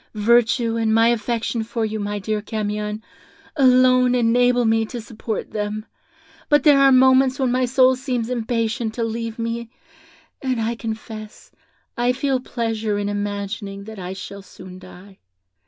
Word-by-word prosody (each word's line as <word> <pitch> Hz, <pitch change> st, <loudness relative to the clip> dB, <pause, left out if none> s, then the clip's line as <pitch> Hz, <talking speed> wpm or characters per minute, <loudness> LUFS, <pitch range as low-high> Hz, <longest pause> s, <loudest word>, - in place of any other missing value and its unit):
Virtue, 230 Hz, +1 st, +2 dB
and 220 Hz, -1 st, +1 dB
my 225 Hz, +1 st, +5 dB
affection 235 Hz, 0 st, -1 dB
for 225 Hz, 0 st, -2 dB
you, 215 Hz, 0 st, -3 dB
my 205 Hz, 0 st, -3 dB
dear 210 Hz, +1 st, -2 dB
Camion, 210 Hz, 0 st, -4 dB, 0.5 s
alone 255 Hz, -2 st, +4 dB
enable 245 Hz, +1 st, +3 dB
me 225 Hz, 0 st, +2 dB
to 240 Hz, +2 st, -6 dB
support 220 Hz, -1 st, -6 dB
them; 210 Hz, 0 st, -3 dB, 0.6 s
but 295 Hz, -2 st, +4 dB
there 290 Hz, -2 st, +6 dB
are 275 Hz, 0 st, +6 dB
moments 260 Hz, 0 st, +5 dB
when 260 Hz, -3 st, 0 dB
my 255 Hz, +1 st, +2 dB
soul 260 Hz, +1 st, +4 dB
seems 250 Hz, -3 st, -3 dB
impatient 230 Hz, -1 st, -2 dB
to 235 Hz, -, -2 dB
leave 230 Hz, 0 st, -4 dB
me, 230 Hz, 0 st, -4 dB, 0.7 s
and 255 Hz, -3 st, -1 dB
I 225 Hz, +1 st, -1 dB
confess 220 Hz, -2 st, -8 dB, 0.4 s
I 245 Hz, +1 st, +1 dB
feel 265 Hz, 0 st, 0 dB
pleasure 225 Hz, -4 st, -2 dB
in 205 Hz, 0 st, -2 dB
imagining 200 Hz, 0 st, -4 dB
that 220 Hz, 0 st, -10 dB
I 180 Hz, 0 st, -5 dB
shall 200 Hz, +1 st, -8 dB
soon 185 Hz, -1 st, -12 dB
die. 190 Hz, +1 st, -15 dB
230 Hz, 155 wpm, -21 LUFS, 210-250 Hz, 0.7 s, there